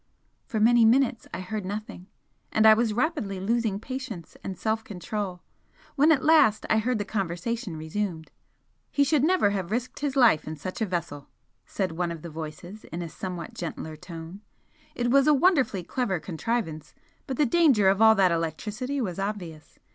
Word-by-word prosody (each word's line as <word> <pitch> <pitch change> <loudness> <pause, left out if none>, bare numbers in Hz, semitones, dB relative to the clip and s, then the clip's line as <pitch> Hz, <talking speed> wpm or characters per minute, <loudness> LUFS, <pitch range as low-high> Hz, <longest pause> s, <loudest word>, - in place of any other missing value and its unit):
For 220 - -2
many 235 +2 +5
minutes 235 +1 +3
I 185 - -5
heard 210 +2 -4
nothing 200 -1 -6 0.4
and 220 - +3
I 220 - +10
was 225 0 +1
rapidly 210 - -1
losing 220 0 0
patience 255 - -7
and 190 - -5
self 220 0 -1
control, 195 -2 -5 0.5
when 300 +3 +5
at 275 -5 +3
last 305 -9 +4
I 220 - +4
heard 245 +2 0
the 205 - -3
conversation 195 0 -3
resumed, 160 +1 -4 0.6
"He 285 - +3
should 285 -1 +2
never 335 - +3
have 190 -3 -3
risked 240 +4 -3
his 285 -2 -2
life 235 - +4
in 155 - -4
such 185 +8 -7
a 220 - +1
vessel" 170 -6 -4 0.4
said 190 -4 -2
one 170 +1 -2
of 165 -2 -8
the 170 - -7
voices 160 +6 -8
in 170 +2 -6
a 170 - -6
somewhat 180 +1 -6
gentler 160 -2 -6
tone 165 +4 -9 0.5
"It 240 0 0
was 275 +2 +5
a 300 - +6
wonderfully 265 - +2
clever 195 -2 -1
contrivance, 160 -4 -3 0.3
but 265 - -3
the 300 - +4
danger 265 - +4
of 195 +2 +3
all 220 0 +7
that 190 -3 +4
electricity 210 - -2
was 185 -5 -3
obvious. 190 -6 -5
210 Hz, 180 wpm, -26 LUFS, 175-240 Hz, 0.6 s, I